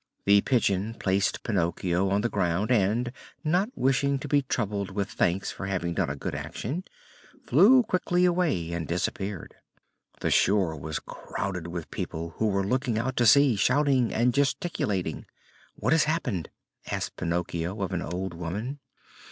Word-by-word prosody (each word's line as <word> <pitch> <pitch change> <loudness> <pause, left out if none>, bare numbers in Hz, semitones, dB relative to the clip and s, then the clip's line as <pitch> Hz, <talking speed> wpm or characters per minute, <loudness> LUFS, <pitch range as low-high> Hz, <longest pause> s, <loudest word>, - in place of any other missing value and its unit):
The 100 0 +6
Pigeon 110 -3 +1
placed 95 -1 0
Pinocchio 90 -1 0
on 100 +2 +2
the 120 - +1
ground 95 +2 0
and, 115 +2 +2 0.3
not 180 +7 +2
wishing 135 +1 +2
to 135 - -6
be 145 0 +3
troubled 105 -7 -2
with 100 +1 -3
thanks 90 +3 0
for 95 - -6
having 90 -3 -1
done - - 0
a 70 - -3
good 70 - -4
action, 155 - -4 0.6
flew 215 - +6
quickly 180 -2 +1
away 160 - +1
and 85 -3 -3
disappeared. 95 +2 -3 0.7
The - - 0
shore 95 -5 +3
was 80 +1 -4
crowded 90 0 -5
with 85 -1 -6
people 80 +1 -4
who 110 - +1
were 100 -1 +1
looking 125 +1 0
out 130 +3 -1
to 120 - +4
sea, 140 -1 +6
shouting 130 +2 +2
and 120 +2 +2
gesticulating. 140 - -1 0.5
"What - - +1
has 160 - +4
happened?" 135 - -1 0.4
asked - - -3
Pinocchio 85 +2 -2
of 95 - -3
an 90 - -1
old 90 +2 -4
woman. 100 - -4
100 Hz, 155 wpm, -27 LUFS, 90-135 Hz, 0.7 s, The